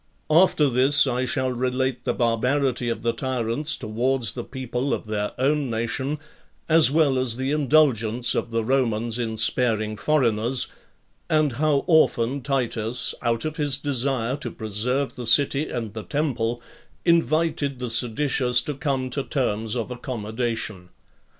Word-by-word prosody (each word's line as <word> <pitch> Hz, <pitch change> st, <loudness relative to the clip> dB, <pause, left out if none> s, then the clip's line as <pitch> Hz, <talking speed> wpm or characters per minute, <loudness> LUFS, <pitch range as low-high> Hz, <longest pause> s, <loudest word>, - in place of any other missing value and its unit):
11. 165 Hz, +4 st, +7 dB
After 150 Hz, -, +1 dB
this, 135 Hz, +3 st, +5 dB
I 130 Hz, -1 st, -1 dB
shall 130 Hz, 0 st, -1 dB
relate 125 Hz, +1 st, -2 dB
the -, -, 0 dB
barbarity 125 Hz, +2 st, 0 dB
of 115 Hz, -1 st, -4 dB
the 115 Hz, 0 st, +1 dB
tyrants 130 Hz, +3 st, -1 dB
towards 120 Hz, +2 st, -1 dB
the 120 Hz, -, -6 dB
people 130 Hz, +1 st, -3 dB
of -, -, -9 dB
their 105 Hz, -1 st, -3 dB
own 140 Hz, +1 st, 0 dB
nation, 120 Hz, +6 st, -2 dB, 0.5 s
as 160 Hz, -5 st, +6 dB
well 145 Hz, -3 st, +2 dB
as 125 Hz, -3 st, +2 dB
the 130 Hz, +1 st, -2 dB
indulgence 130 Hz, -6 st, +2 dB
of -, -, -2 dB
the 115 Hz, -1 st, -1 dB
Romans 115 Hz, -2 st, 0 dB
in 110 Hz, -2 st, -3 dB
sparing 110 Hz, -1 st, +1 dB
foreigners; 120 Hz, -3 st, +2 dB, 0.6 s
and 155 Hz, -2 st, +2 dB
how 145 Hz, +3 st, +1 dB
often 140 Hz, -6 st, +2 dB
Titus, 120 Hz, -3 st, -1 dB
out 115 Hz, 0 st, 0 dB
of 155 Hz, 0 st, -4 dB
his 145 Hz, -3 st, 0 dB
desire 135 Hz, -3 st, 0 dB
to 145 Hz, -, -5 dB
preserve 120 Hz, +6 st, -2 dB
the 120 Hz, -2 st, -5 dB
city 140 Hz, +4 st, +3 dB
and 115 Hz, -4 st, -5 dB
the 110 Hz, -, -5 dB
temple, 120 Hz, -5 st, -2 dB, 0.4 s
invited 160 Hz, -4 st, +1 dB
the 125 Hz, -2 st, -4 dB
seditious 125 Hz, +1 st, +2 dB
to 150 Hz, -, -4 dB
come 135 Hz, -2 st, -2 dB
to 140 Hz, -, 0 dB
terms 115 Hz, -6 st, -2 dB
of 120 Hz, 0 st, -3 dB
accommodation. 115 Hz, -5 st, -4 dB
125 Hz, 150 wpm, -23 LUFS, 115-140 Hz, 0.6 s, 11